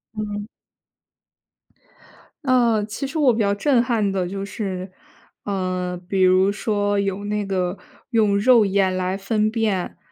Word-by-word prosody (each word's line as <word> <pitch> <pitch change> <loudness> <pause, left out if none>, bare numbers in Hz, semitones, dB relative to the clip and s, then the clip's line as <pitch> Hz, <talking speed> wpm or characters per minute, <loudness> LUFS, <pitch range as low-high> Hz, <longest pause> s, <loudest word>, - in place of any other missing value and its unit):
嗯。 210 -1 -4 2.0
呃， 240 -5 +3
其 225 +6 -5
实 310 +4 -5
我 275 -5 +4
比 225 - -3
较 200 -2 +2
震 245 +4 +2
撼 225 -5 0
的 185 -2 -1
就 195 +2 -5
是 190 -2 -5 0.5
嗯， 185 -2 -2
比 190 0 0
如 185 +1 +4
说 205 -1 0
有 200 0 -2
那 210 0 -2
个 185 -1 -2 0.3
用 210 -3 +3
肉 235 0 +5
眼 190 -1 +1
来 185 +1 -1
分 215 +2 0
辨 215 -5 -1
205 Hz, 150 characters per minute, -22 LUFS, 190-220 Hz, 2.0 s, 肉